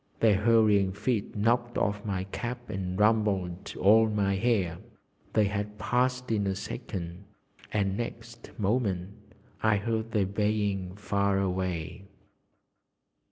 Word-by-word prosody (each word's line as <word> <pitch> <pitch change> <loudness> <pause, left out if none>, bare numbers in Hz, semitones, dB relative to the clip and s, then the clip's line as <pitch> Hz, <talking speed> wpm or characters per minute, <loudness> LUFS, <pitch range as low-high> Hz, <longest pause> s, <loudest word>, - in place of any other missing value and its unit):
Their 110 -4 +4
hurrying 105 -3 +4
feet 110 +1 -2
knocked 120 +3 +1
off 105 0 0
my 95 -3 -2
cap 120 +5 -5
and 95 -1 -3
rumpled 105 -4 +1
all 110 +3 +6
my 100 -2 +1
hair. 95 -6 +1 0.5
They 110 - +4
had 105 +1 -2
passed 125 +1 0
in 105 -3 +1
a 95 - 0
second, 85 +1 -6 0.5
and 100 -2 0
next 115 0 -6
moment 100 -4 0 0.5
I 110 -1 +3
heard 110 +2 -2
their 105 -4 +2
baying 100 -2 -1
far 100 -1 0
away. 95 -2 -2
105 Hz, 120 wpm, -28 LUFS, 95-110 Hz, 0.5 s, all